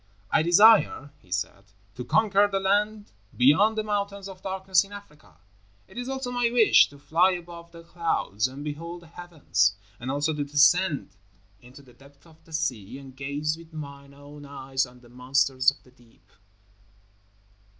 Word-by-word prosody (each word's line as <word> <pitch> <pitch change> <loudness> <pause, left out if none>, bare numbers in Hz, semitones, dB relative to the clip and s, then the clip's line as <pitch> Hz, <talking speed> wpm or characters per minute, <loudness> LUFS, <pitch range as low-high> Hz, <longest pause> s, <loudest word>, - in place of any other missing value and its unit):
"I - - +3
desire," 175 -4 +5
he 90 - -25
said, 100 +2 -4 0.3
"to 125 - -7
conquer 205 - +3
the 195 -1 -2
land 205 +2 0 0.3
beyond 175 - +4
the 215 - 0
Mountains 200 -1 -3
of 190 -1 -11
Darkness 190 -1 +1
in 200 - -16
Africa; 150 - -14 0.5
it - - -18
is 245 +1 -5
also 265 -2 -4
my 245 -1 +1
wish 235 -2 +5
to 145 - -16
fly 170 +6 +2
above 170 -1 -9
the 165 0 -13
clouds 165 - -1
and 135 +3 -9
behold 170 +4 -7
the - - -16
heavens, 165 - -1 0.2
and 125 - -6
also 145 +3 0
to 150 -1 -2
descend 145 - +2 0.4
into 125 +3 -15
the 125 -2 -19
depths 140 +4 -21
of 160 -1 -21
the 165 - -19
sea 125 -6 -3
and 135 -2 -13
gaze 145 +3 -3
with 165 -1 -16
mine 140 -2 -10
own 145 +1 -13
eyes 135 -1 -3
on 125 0 -18
the 120 - -18
monsters 130 +1 +2
of 140 - -8
the 125 - -21
deep." 115 -6 -26
155 Hz, 170 wpm, -26 LUFS, 135-190 Hz, 0.5 s, desire